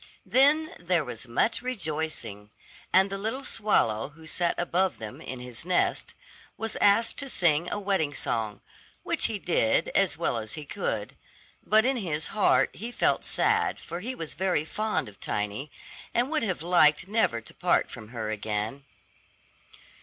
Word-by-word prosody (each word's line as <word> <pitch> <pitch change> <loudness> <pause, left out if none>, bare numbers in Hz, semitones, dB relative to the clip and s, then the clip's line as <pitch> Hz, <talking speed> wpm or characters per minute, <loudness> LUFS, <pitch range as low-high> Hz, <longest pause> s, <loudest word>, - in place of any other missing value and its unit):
Then 295 +4 +4
there 175 -3 +1
was 125 0 -6
much 120 - +1
rejoicing, 155 - -3 0.4
and 190 +1 +5
the 195 - -3
little 225 +7 -2
swallow 135 - +1
who 160 +2 -16
sat 170 +2 0
above 180 +2 +1
them, 110 -1 -8
in 130 - -6
his 125 0 -7
nest, 180 +1 0 0.4
was 225 -1 -3
asked 205 +3 +4
to 275 -1 -4
sing 170 - +2
a - - -1
wedding 195 -7 0
song, 110 -5 -2 0.4
which - - 0
he 220 - 0
did 165 - +1
as 190 -7 +2
well 140 -8 0
as 110 -1 -6
he 150 - -6
could; 130 - -3 0.5
but 220 +2 +4
in 265 0 +2
his 160 -8 -2
heart 210 -1 +3
he 230 +4 -6
felt - - +1
sad - - +1
for 170 +1 -6
he 250 +7 -4
was 165 -7 -6
very 180 -3 0
fond 215 - -1
of 100 -2 -13
Tiny, 105 +8 -3 0.5
and 245 +5 +2
would 310 - +1
have 185 -8 -2
liked 170 -1 +4
never 205 - +2
to 115 - -13
part - - +1
from 110 -2 -9
her 110 -2 -4
again. 110 +5 -3
170 Hz, 165 wpm, -27 LUFS, -, 0.5 s, and